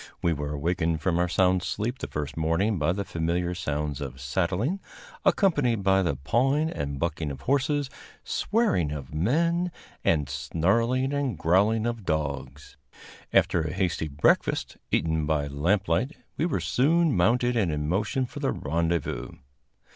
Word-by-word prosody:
We 85 - +3
were 75 -1 -4
awakened 80 +2 0
from 85 +1 0
our 90 - +2
sound 90 +1 +3
sleep 115 +8 -3
the - - -4
first 75 0 -4
morning 85 +6 +1
by 75 +3 +2
the 100 +2 -2
familiar 85 +2 -1
sounds 75 -4 -3
of 65 -2 -6
saddling, 95 - -1 0.4
accompanied 140 - +2
by 95 0 +4
the 85 -6 0
pawing 135 - +1
and 70 -1 -4
bucking 80 -1 -2
of 70 -1 -7
horses, 140 - +1 0.4
swearing 205 - +1
of 70 -3 -6
men, 170 - +1 0.3
and 75 -4 +2
snarling 100 - +1
and 140 - -1
growling 100 +8 +3
of 120 -2 -2
dogs. 70 -4 -3 0.5
After 85 - +3
a 80 0 -3
hasty 90 -4 -1
breakfast, 70 0 +1
eaten 80 -2 +1
by 75 -2 +1
lamplight, 90 - 0 0.2
we 165 - 0
were - - -1
soon 160 +3 +2
mounted 120 +7 +3
and 100 -8 +2
in 75 0 -2
motion 105 - 0
for - - -9
the - - 0
rendezvous. 80 -5 -2
90 Hz, 150 wpm, -27 LUFS, 75-120 Hz, 0.5 s, by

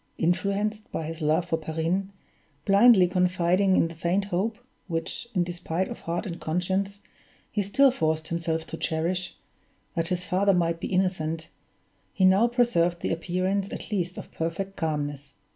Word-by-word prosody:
Influenced, 200 +5 0
by 160 - -3
his 165 +1 -6
love 155 +3 +2
for 165 -1 0
Perrine, 165 +5 -1 0.6
blindly 200 -1 +7
confiding 180 +1 +2
in - - +4
the 165 - -8
faint 175 +4 0
hope 200 +4 -1 0.3
(which, 165 +6 -2
in 180 - +3
despite 175 +1 -3
of - - -7
heart 170 +5 -3
and 170 -4 -5
conscience, 190 +4 -1 0.5
he 210 - 0
still 260 +8 +4
forced 160 -8 -1
himself 165 -1 -1
to 165 - -7
cherish) 170 +4 -2 0.6
that 165 -2 -1
his 180 0 -2
father 195 +2 +3
might 170 -1 +1
be - - -3
innocent, 165 -4 -1 0.6
he 190 - +3
now 195 +5 +5
preserved 180 -9 +2
the - - -1
appearance 185 +4 -1
at - - -7
least 180 -3 -1
of - - -8
perfect 180 +4 -3
calmness. 145 -3 -3
180 Hz, 160 wpm, -26 LUFS, 165-195 Hz, 0.6 s, blindly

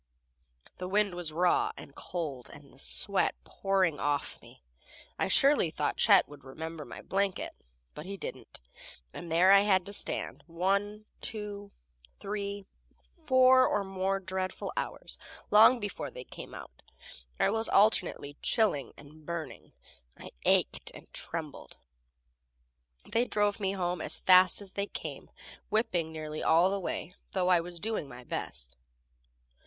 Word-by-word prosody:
The 180 - -4
wind 205 0 +2
was 175 -3 -4
raw 175 +3 +2
and 140 - -11
cold, 145 -9 -5
and 140 -3 -15
the 135 - -19
sweat 200 +7 +1
pouring 190 -6 0
off 145 -1 -1
me. - - -17 0.6
I - - +1
surely 275 - +4
thought 150 -1 -2
Chet 200 -3 +6
would 145 -2 -14
remember 160 +3 -7
my - - -10
blanket, 195 -1 -1 0.4
but 150 +4 -9
he 200 0 -5
didn't, - - -8 0.5
and 170 - -8
there 175 +4 +5
I 200 - +9
had 190 -3 +3
to 200 - -6
stand - - -3
one, 200 +5 -1 0.2
two, 205 -2 -4 0.5
three, 200 0 -4 0.6
four 260 -1 +6
or 205 - 0
more 195 0 -1
dreadful 185 0 -4
hours. - - -4 0.3
Long 225 +4 +7
before 205 -3 -4
they 125 - -9
came - - -10
out - - -11 0.6
I - - +3
was 225 +1 -1
alternately 180 -8 +2
chilling 210 - +1
and 150 +2 -15
burning. 160 -3 -6 0.5
I - - -10
ached - - +2
and - - -14
trembled. - - -6 1.3
They 230 +2 +1
drove 205 -3 +1
home 190 -3 -1
as - - 0
fast 185 +1 +6
as 195 -2 -10
they 200 +1 -2
came, - - -7 0.4
whipping 185 -7 0
nearly 155 -1 -5
all 170 +4 +4
the 200 - -1
way, 180 -1 -4 0.2
though 185 -1 +1
I 180 -2 +5
was 170 0 -7
doing 215 -6 -2
my 125 -1 -11
best. 65 - -5
185 Hz, 145 wpm, -30 LUFS, 160-205 Hz, 1.3 s, I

